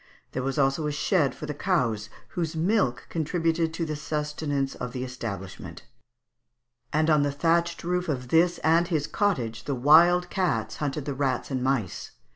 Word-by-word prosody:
There 130 - -2
was 135 +3 -2
also 135 +2 +2
a - - -1
shed 150 -2 +1
for - - -7
the 150 - -4
cows, 120 - 0 0.2
whose 165 -2 -3
milk 165 - +1
contributed 165 0 0
to 165 - -1
the 155 -1 -3
sustenance 150 -2 -2
of 125 - -6
the 130 -1 -3
establishment; 100 -8 -7 1.1
and 155 +1 +2
on 155 -2 +4
the 145 0 +1
thatched 170 +3 +1
roof 180 0 -1
of 125 -4 -3
this 175 +3 +4
and 165 +2 +4
his 155 -5 0
cottage 120 - -1
the 140 - -1
wild 170 +7 +5
cats 115 - -1
hunted 145 -1 -3
the 145 - -2
rats 135 -1 -1
and 130 -1 -1
mice. 100 - -1
150 Hz, 170 wpm, -26 LUFS, 130-165 Hz, 1.1 s, wild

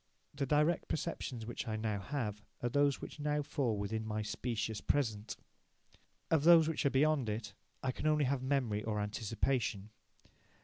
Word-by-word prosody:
The 140 -1 -2
direct 150 +4 +2
perceptions 125 -6 -3
which 120 +2 -5
I 110 - -1
now 110 -2 -1
have 105 -3 -3 0.2
are 120 - +1
those 145 +2 +2
which - - -8
now 150 0 0
fall 135 -6 0
within 105 +2 -2
my 110 0 -2
"specious 110 -1 -2
present". 110 -7 -1 0.9
Of 160 -3 +4
those 165 -1 +8
which 160 -3 +1
are - - +4
beyond 140 -3 +2
it, 105 -1 -4 0.3
I 130 - +1
can 150 - -3
only 150 -1 +3
have 130 0 0
memory 130 -6 0
or 105 -1 -1
anticipation. 110 0 -1
125 Hz, 165 wpm, -34 LUFS, 110-145 Hz, 0.9 s, those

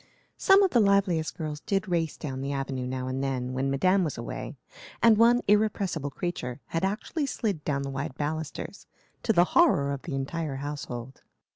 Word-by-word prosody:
Some 390 +1 +6
of 380 - +2
the 240 - +4
liveliest 200 -6 +2
girls 155 -2 -4
did 195 +5 -1
race 165 -4 -1
down 135 -4 -5
the 140 +1 -2
avenue 135 -2 -3
now 130 0 -3
and 130 +1 -2
then, 130 -2 -2
when 135 +1 0
Madame 185 +8 +3
was 155 -6 -3
away, 120 +5 -6 0.4
and 230 -1 +6
one 235 +3 +5
irrepressible 200 -7 +1
creature 135 -5 -4
had 165 - -2
actually 220 - -1
slid 200 - -2
down 140 -2 -1
the 140 - -4
wide 135 -1 -4
balusters, 155 +1 -4 0.3
to 225 - +2
the 175 -5 +5
horror 210 - +4
of 140 - -5
the 150 - -5
entire 140 +2 -3
household. 135 -3 -6
155 Hz, 180 wpm, -27 LUFS, 135-195 Hz, 0.4 s, Some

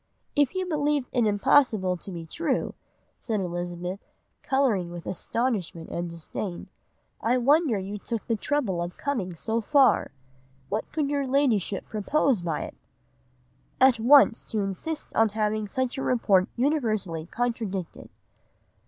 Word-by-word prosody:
"'If 290 +5 +2
you 375 0 -1
believed 295 -5 0
it 240 -3 +2
impossible 205 -2 +3
to 185 +2 -8
be 170 -2 -6
true,' 290 - -1 0.5
said 220 -3 -2
Elizabeth, 175 +1 -4 0.4
colouring 255 -11 +1
with 175 -1 -8
astonishment 190 -5 -2
and 175 0 -3
disdain, 170 +2 -6 0.5
'I 245 +3 +2
wonder 280 -1 +3
you 200 +2 -5
took 230 +1 -4
the 230 - 0
trouble 215 -7 -1
of 175 +1 -5
coming 220 -12 -2
so 225 +7 -1
far. 275 +4 +4 0.6
What 215 +2 -3
could 295 -2 -1
your 280 -2 0
Ladyship 245 -8 +1
propose 230 +1 +1
by 165 -3 -2
it?' - - -7 1.0
"'At 260 -3 +5
once 245 0 +6
to 215 - -1
insist 200 - -4
on 225 -1 +4
having 215 0 0
such 260 +4 -2
a - - -2
report 200 -8 +2
universally 215 - 0
contradicted. 220 -6 -3
220 Hz, 135 wpm, -26 LUFS, 185-270 Hz, 1.0 s, once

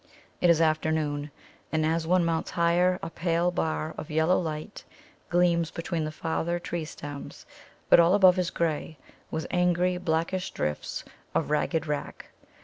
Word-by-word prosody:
It 175 - +4
is 165 -1 +5
afternoon, 155 -2 0 0.4
and 155 -1 +1
as 160 0 0
one 180 0 +3
mounts 165 -1 -1
higher 175 +2 +2
a 165 - -4
pale 170 +1 +1
bar 160 -2 -2
of 150 - -7
yellow 160 +3 +3
light 155 -3 -5 0.5
gleams 170 -2 +2
between 165 -1 -3
the 155 - -4
farther 165 +2 -2
tree 170 -1 -4
stems, 145 -2 -8 0.4
but - - +7
all 170 +3 +5
above 185 -2 +6
is 180 - 0
grey, 160 -1 -2 0.3
with 160 0 -3
angry, 180 0 +2
blackish 175 +2 -1
drifts 75 -1 -3 0.3
of - - 0
ragged 160 +1 +1
wrack. 150 -2 -5
165 Hz, 150 wpm, -27 LUFS, 155-175 Hz, 0.5 s, but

